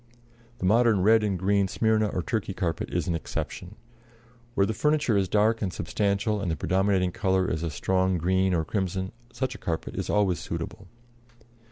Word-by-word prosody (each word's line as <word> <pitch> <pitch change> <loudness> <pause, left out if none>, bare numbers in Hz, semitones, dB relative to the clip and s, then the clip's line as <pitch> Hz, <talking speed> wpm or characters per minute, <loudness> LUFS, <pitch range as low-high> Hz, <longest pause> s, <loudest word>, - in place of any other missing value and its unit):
The 105 - -4
modern 110 -1 +4
red 110 +2 +5
and 100 -3 0
green 100 +2 +2
Smyrna 110 +2 +2
or 90 -3 -2
Turkey 100 -2 -2
carpet 85 -5 -2
is - - -1
an 85 - 0
exception. 90 +3 -5 0.8
Where 100 - +4
the 110 - -1
furniture 150 -1 +1
is 95 -2 +1
dark 110 +3 +2
and 95 -4 -1
substantial, 105 +2 -1
and 95 - -2
the 80 - 0
predominating 95 +3 +1
color 95 -4 +1
is 80 - -2
a 85 - -2
strong 95 +4 +1
green 95 +3 +1
or 80 -1 0
crimson, 95 0 -2 0.2
such 130 +1 -2
a 105 - -10
carpet 80 -2 -3
is - - -3
always 95 -6 +2
suitable. - - -6
95 Hz, 180 wpm, -26 LUFS, 90-110 Hz, 0.8 s, red